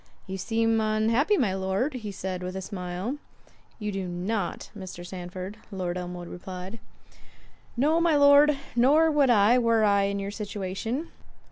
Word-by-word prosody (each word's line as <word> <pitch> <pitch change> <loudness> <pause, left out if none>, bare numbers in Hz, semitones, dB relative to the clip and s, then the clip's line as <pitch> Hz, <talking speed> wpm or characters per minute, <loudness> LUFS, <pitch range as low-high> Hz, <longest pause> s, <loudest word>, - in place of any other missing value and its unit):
"You 190 - -5
seem 225 +3 +1
unhappy, 225 - +2
my 220 -9 +1
Lord," 195 +8 -1
said 190 -1 -4
he, - - -6
with 185 +1 -5
a 190 - -3
smile. 185 +7 -4 0.6
"You 210 -2 -3
do 195 -2 -3
not—Mr. 185 0 -4
Sandford," 185 +2 -7
Lord 180 -3 -3
Elmwood 180 -1 -6
replied. 185 +4 -8 1.0
"No, 310 +6 +3
my 335 -2 +3
Lord, 285 0 +6 0.2
nor 295 +7 +5
would 290 -3 +3
I, 230 +2 +5
were 230 -2 +3
I 200 -1 +4
in 200 0 -1
your 200 0 -4
situation. 210 - -4
205 Hz, 145 wpm, -27 LUFS, 185-245 Hz, 1.0 s, Lord